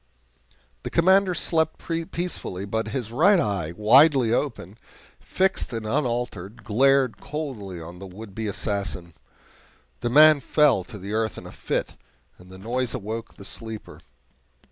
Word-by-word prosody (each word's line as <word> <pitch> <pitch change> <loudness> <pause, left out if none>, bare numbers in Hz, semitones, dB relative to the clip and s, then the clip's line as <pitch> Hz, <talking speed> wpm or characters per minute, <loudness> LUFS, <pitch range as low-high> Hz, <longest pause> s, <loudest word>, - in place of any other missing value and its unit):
The - - -5
Commander 190 +2 +3
slept 160 -2 0 0.3
peacefully, 170 - -4
but 110 +3 -2
his 120 -5 -4
right 175 - +4
eye, 95 - -1
widely 125 +2 +5
opened, 115 - -3 0.4
fixed 190 0 -1
and 115 -1 -4
unaltered, 120 -5 -3
glared 130 +2 +2
coldly 125 - -6
on 85 +2 -10
the 95 - -8
would 100 +2 -11
be 110 +2 -4
assassin. 100 -4 -3 0.9
The 120 - -2
man 150 +3 +7
fell 145 -7 +3
to 110 -1 -10
the 100 +2 -7
earth 110 0 -1
in - - -9
a - - -9
fit, - - -3 0.4
and 90 0 -16
the 95 - -11
noise 120 +5 -2
awoke 115 0 -6
the 100 - -12
sleeper. 110 0 -7
115 Hz, 145 wpm, -24 LUFS, 100-140 Hz, 0.9 s, man